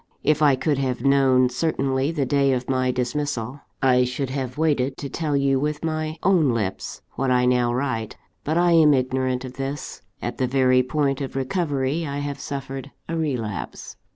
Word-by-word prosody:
If 155 0 +2
I 145 -3 +5
could 135 +2 0
have 130 -2 -2
known 135 -2 +4
certainly 135 0 0
the 150 -5 -1
day 140 0 +2
of 125 -1 -2
my 130 -1 +1
dismissal, 125 0 -2 0.2
I 125 -1 +5
should 125 +1 -3
have 130 -1 -4
waited 140 -4 +1
to 140 - -5
tell 150 0 -1
you 135 -1 +2
with 150 +2 -2
my 155 0 -2
own 165 -10 +3
lips 100 -4 -4
what 135 0 -2
I 125 0 +3
now 125 -1 +2
write 120 -4 -2 0.3
but 155 +3 0
I 175 0 +4
am 155 -3 +6
ignorant 130 0 -1
of 125 0 -10
this. 135 +2 -5 0.2
At - - -5
the 130 - +2
very 130 0 +4
point 135 +1 0
of 135 - -5
recovery 145 +1 -1
I 140 0 -4
have 145 -1 -4
suffered 135 -1 -6 0.2
a 165 - -3
relapse. 125 - -4
135 Hz, 180 wpm, -23 LUFS, 130-145 Hz, 0.3 s, am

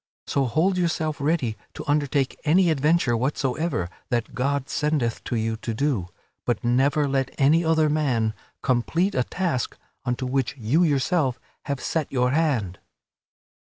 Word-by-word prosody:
So 140 -1 +1
hold 170 +9 +1
yourself 160 -3 -1
ready 140 -7 +1 0.2
to - - -6
undertake 145 -2 +1
any 170 +3 +4
adventure 150 -3 +2
whatsoever 135 - -1 0.2
that 120 -3 -1
God 140 +1 -1
sendeth 150 -6 -1
to - - -2
you 110 0 -1
to 115 0 -4
do, 125 -9 0 0.4
but 120 -3 -1
never 140 +5 +2
let 135 -1 0
any 150 +5 +4
other 160 -1 +3
man 130 -8 +1 0.3
complete 165 +10 +1
a 125 - +2
task 170 -5 -2 0.3
unto 125 +1 -2
which 130 +1 -1
you 125 +8 +2
yourself 145 -3 +1 0.3
have 140 -2 -2
set 160 -3 -2
your 125 -1 +2
hand." 130 - 0
140 Hz, 145 wpm, -24 LUFS, 125-155 Hz, 0.4 s, any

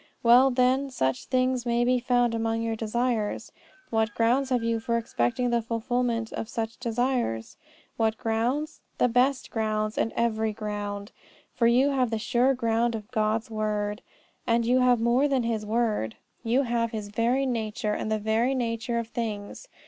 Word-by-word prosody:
Well, 245 +3 +7
then, 260 +2 +2
such 130 - -1
things 255 -1 +1
being 240 +1 +1
found 245 -1 +2
among 225 0 -1
your 225 -1 -1
desires, 225 0 -1 0.4
what 220 0 0
grounds 250 +4 +2
have 250 -3 +1
you 230 0 0
for 235 +1 -1
expecting 230 - -1
the 235 0 +2
fulfilment 230 0 -1
of 225 - -4
such 230 0 -4
desires? 240 - -1 0.4
What 220 -1 +1
grounds? 245 +8 -1 0.2
The - - +3
best 250 +3 +2
of - - -38
grounds 215 -1 -1
and 225 - +1
every 220 -2 0
ground. 205 -1 -5 0.4
For 230 - +2
you 255 +4 +4
have 255 -3 +1
the 225 - -1
sure 245 +4 +2
ground 230 -1 +1
of 215 +1 -8
God's 220 0 0
word. 210 0 -2 0.5
And 230 0 +2
you 250 +2 +3
have 250 -2 +4
more 240 +5 +3
than 270 -3 +1
His 220 -2 -2
word: 215 - 0 0.3
you 245 +4 +2
have 235 -2 0
His 215 -2 -5
very 235 +5 +1
nature, 220 -3 -2
and 215 - -3
the 215 - +2
very 220 +5 +1
nature 235 -1 -2
of 230 -1 -2
things. 220 - -5
230 Hz, 170 wpm, -27 LUFS, 220-245 Hz, 0.5 s, Well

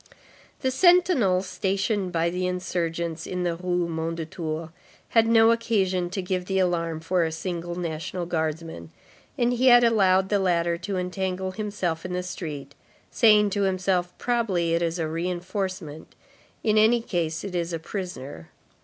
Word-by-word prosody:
The 260 - +1
sentinel 340 - +4
stationed 195 0 -1
by 170 0 +1
the 180 +1 -1
insurgents 170 -2 -3
in 180 -1 -3
the 175 -1 0
Rue 180 0 -1
Mondétour 160 0 -4 0.4
had 225 -1 +4
no 225 0 +6
occasion 190 -6 0
to 190 +1 -3
give 180 0 -2
the 190 +1 -1
alarm 170 -3 0
for 175 +1 +1
a 160 - -1
single 175 +1 -4
National 170 +1 -4
Guardsman, 160 - -3 0.5
and 240 0 +2
he 250 +2 +2
had 245 -1 +8
allowed 190 -5 +3
the 205 - +2
latter 170 -2 +1
to 190 +2 -3
entangle 185 +1 -2
himself 190 -5 -3
in 180 - -5
the 180 0 -2
street, 150 -6 -6 0.4
saying 210 -3 +5
to 205 - -1
himself: 185 -2 0
"Probably 195 -9 0
it 170 - +1
is 170 0 -1
a 165 -2 -1
reinforcement, 175 -1 -4 0.5
in 215 -1 +3
any 225 +2 +4
case 165 -6 -2
it 200 -2 -6
is 170 -1 -2
a 165 - -1
prisoner." 160 - -7
180 Hz, 155 wpm, -25 LUFS, 165-195 Hz, 0.5 s, had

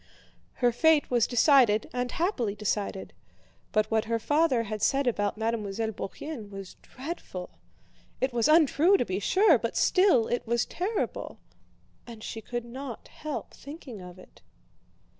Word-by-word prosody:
Her 245 -2 +2
fate 305 +4 +3
was 240 -3 +3
decided 245 -4 +4
and 245 0 -2
happily 270 - -1
decided. 205 -2 -3 0.6
But 215 0 +1
what 220 0 +2
her 230 +1 0
father 290 0 +2
had 215 -1 -5
said 275 +4 +2
about 205 -4 0
Mademoiselle 220 -1 -2
Bourienne 220 +3 -7
was 195 -2 -9
dreadful. 255 - -8 0.6
It 260 -1 0
was 235 +2 +2
untrue 320 +4 +5
to 245 - 0
be 190 -1 -2
sure, 370 - +4
but 230 0 -3
still 365 - +4
it 240 -1 -2
was 235 +1 +1
terrible, 395 +5 -3 0.7
and 225 -2 -10
she 225 - -6
could 240 +2 -5
not 250 0 -8
help 305 -2 -6
thinking 280 - -10
of 180 0 -11
it. 185 - -17
240 Hz, 145 wpm, -28 LUFS, 215-290 Hz, 0.7 s, untrue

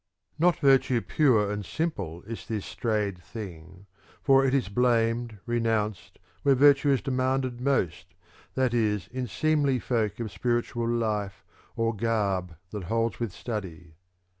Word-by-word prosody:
(95) - - -5
Not 175 -1 +4
virtue 130 -3 +4
pure 110 -10 +2
and 105 0 -3
simple 90 - -3
is 115 0 -8
this 110 -3 -3
strayed 105 -5 -2
thing; 90 -2 -9 0.4
for 135 0 +5
it 135 - +2
is 135 - +1
blamed, 115 0 +1
renounced, 110 -6 -1 0.2
where 140 -1 +4
virtue 140 +1 +5
is 135 -3 +3
demanded 130 -2 -1
most, 90 - -1 0.4
that 130 -2 +1
is 105 -5 +1
in 130 -1 -3
seemly 145 +5 +1
folk 115 -3 -1
of 110 -3 -4
spiritual 120 +2 -1
life 105 -5 -1 0.3
or 115 0 0
garb 100 -5 -1 0.2
that 105 -4 -5
holds 115 +4 -1
with 115 -4 -2
study. 90 -8 -6
115 Hz, 140 wpm, -27 LUFS, 100-130 Hz, 0.4 s, for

